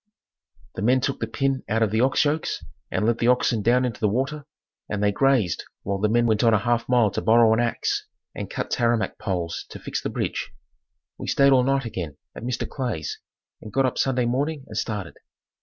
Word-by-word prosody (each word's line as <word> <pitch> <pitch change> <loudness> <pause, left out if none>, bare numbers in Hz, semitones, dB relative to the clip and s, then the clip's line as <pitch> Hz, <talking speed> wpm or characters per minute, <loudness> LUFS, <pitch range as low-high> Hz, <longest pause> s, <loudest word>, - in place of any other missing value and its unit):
The - - -5
men 125 +5 +4
took 135 +1 -2
the 115 - -2
pin 135 +3 0
out 110 +1 +2
of 105 - 0
the 110 +1 +2
ox 130 +3 +3
yokes 150 +2 -1 0.2
and 95 - 0
let 115 0 +1
the 120 - +2
oxen 125 -3 +3
down 125 +4 +3
into 120 -2 -4
the 105 -3 +2
water 140 +6 -2 0.4
and 105 -1 -2
they 105 - +3
grazed 125 -6 +2 0.2
while 100 0 -2
the 105 +1 +2
men 120 +2 +3
went 110 -1 +2
on 115 -2 +5
a - - +5
half 120 +3 0
a - - -1
mile 120 -5 +4
to - - -2
borrow 115 0 +5
an 110 - +1
ax 120 -1 -1 0.3
and - - -6
cut - - -4
tamarack 120 -2 +1
poles 90 -6 -2
to - - -8
fix - - -4
the - - -3
bridge. - - -3 0.7
We - - -6
stayed 140 0 +4
all 130 - +5
night 135 +1 +1
again 85 -10 -5 0.2
at - - -8
Mr. 120 0 -2
Clay's 120 - -4 0.4
and 105 - -9
got 135 +5 +2
up 130 - -1
Sunday 130 -2 +1
morning 140 +4 -1
and - - -9
started. 105 -6 -3
120 Hz, 220 wpm, -24 LUFS, 105-130 Hz, 0.7 s, on